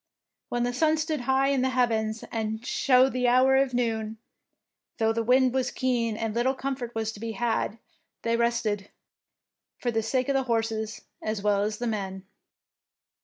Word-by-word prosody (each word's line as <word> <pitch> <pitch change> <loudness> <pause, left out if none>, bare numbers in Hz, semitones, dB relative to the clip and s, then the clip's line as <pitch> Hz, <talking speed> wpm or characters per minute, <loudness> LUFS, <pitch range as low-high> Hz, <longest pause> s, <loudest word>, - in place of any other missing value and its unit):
When 240 0 0
the 245 0 -1
sun 315 +4 +2
stood 310 -2 -1
high 270 +1 +3
in 275 -2 +2
the 260 - +2
heavens 225 -3 0
and 220 0 -3
showed 260 0 +3
the 250 -1 +1
hour 255 +2 +5
of 265 -2 +2
noon, 225 -2 -1 0.8
though 225 -1 +2
the 230 - 0
wind 250 +2 +4
was 260 -1 +1
keen 235 -4 0
and 225 -1 -2
little 250 +4 +1
comfort 260 -3 -4
was 220 -1 -1
to 215 - -11
be 225 +1 -4
had, 230 -1 -1 0.5
they 230 0 +1
rested, 230 -4 0 0.9
for 240 - -1
the 225 -1 +1
sake 255 +3 0
of 280 - +1
the 270 - +2
horses 225 -1 -1 0.2
as 215 -2 -3
well 205 -1 +2
as 210 +1 -1
the 245 - -3
men. 195 -4 -3
235 Hz, 175 wpm, -27 LUFS, 220-255 Hz, 0.9 s, hour